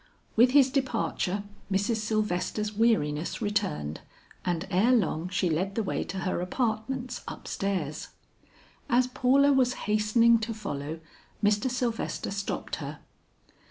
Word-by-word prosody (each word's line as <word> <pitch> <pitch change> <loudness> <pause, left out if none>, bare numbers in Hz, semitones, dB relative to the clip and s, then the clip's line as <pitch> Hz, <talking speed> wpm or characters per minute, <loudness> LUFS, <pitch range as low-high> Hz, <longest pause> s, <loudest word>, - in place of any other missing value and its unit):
With 240 +3 +6
his 275 -2 +6
departure 230 -7 -1 0.3
Mrs. 200 +4 +1
Sylvester's 215 -1 -1
weariness 175 -9 +1
returned, 75 - -1 0.4
and 175 0 -1
ere 215 +8 +4
long 180 -6 +1
she 185 0 0
led 185 +5 -1
the 225 - 0
way 190 - -1
to 190 - -5
her 180 0 -1
apartments 240 +5 -2
up - - -8
stairs. 180 -7 -2 0.8
As 250 0 +4
Paula 270 +2 +4
was 255 -2 +3
hastening 215 +2 +4
to 225 0 -3
follow 160 -6 -5 0.4
Mr. 205 +4 +3
Sylvester 245 -5 -2
stopped 200 0 -3
her. - - -6
215 Hz, 125 wpm, -28 LUFS, 185-240 Hz, 0.8 s, With